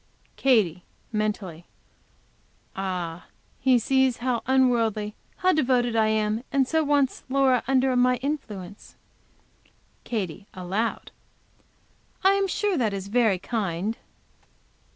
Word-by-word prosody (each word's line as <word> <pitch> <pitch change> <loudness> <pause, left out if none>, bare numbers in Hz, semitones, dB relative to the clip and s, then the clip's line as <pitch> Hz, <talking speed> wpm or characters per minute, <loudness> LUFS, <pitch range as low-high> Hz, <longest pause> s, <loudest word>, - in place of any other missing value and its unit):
Katy, 210 -10 +2 0.3
mentally. 205 -6 -3 1.1
"Ah! 180 -3 -4 0.3
He 255 -1 +4
sees 265 +1 +2
how 245 -1 -1
unworldly, 230 -5 +2 0.2
how 370 0 +3
devoted 245 -5 +1
I 220 -1 +3
am, 215 +1 0
and 270 -2 +2
so 320 +2 +1
wants 285 -2 +1
Laura 260 -2 +3
under 260 -1 +2
my 250 0 +4
influence." 225 -8 -6 1.1
Katy, 200 -3 -4
aloud. 190 +5 -3 1.1
"I 385 - +6
am 395 0 +1
sure 395 0 0
that 225 -6 +1
is 195 0 -6
very 220 -4 +3
kind." 200 0 -2
235 Hz, 110 wpm, -25 LUFS, 200-265 Hz, 1.1 s, I